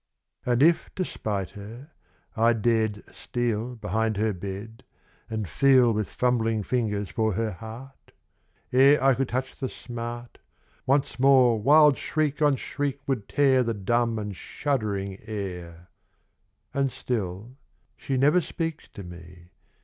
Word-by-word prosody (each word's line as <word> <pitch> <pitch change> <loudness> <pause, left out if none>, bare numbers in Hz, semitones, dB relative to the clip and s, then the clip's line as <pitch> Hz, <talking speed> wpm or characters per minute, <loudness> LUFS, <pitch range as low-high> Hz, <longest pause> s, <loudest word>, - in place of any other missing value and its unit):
And 120 +2 +3
if 165 +1 +3
to 185 - -1
spite 100 - -3
her, 115 +8 -11 0.4
I 115 +1 +4
dared 110 -2 0
steal 120 0 -2
Behind 110 0 -1
her 110 0 +1
bed, 100 +6 -7 0.5
and 110 -3 -3
feel 125 - +4
With 105 -1 -2
fumbling 115 -3 0
fingers 105 -4 -1
for 110 -2 0
her 110 +3 -1
heart... 115 +7 -11 0.6
1 130 - +4
Ire 140 +2 +7
I 135 0 +6
could 130 0 -1
touch 130 +1 -3
the 130 -3 -3
smart 120 0 -7 0.5
Once 135 -2 +1
more 130 -4 +5
wild 150 +3 +6
shriek 150 -1 -1
on 145 -2 +4
shriek 140 +1 -3
would 125 -7 -2
tear 135 -2 +4
The 115 -2 -1
dumb 115 +3 0
and 105 -2 -4
shuddering 100 - -3
air... 90 -5 -7 0.8
And 135 -1 0
still 115 -1 -4 0.4
she 135 - -3
never 150 +7 +4
speaks 165 -1 -4
to 100 - -10
me. 85 0 -13
115 Hz, 140 wpm, -26 LUFS, 105-135 Hz, 0.8 s, Ire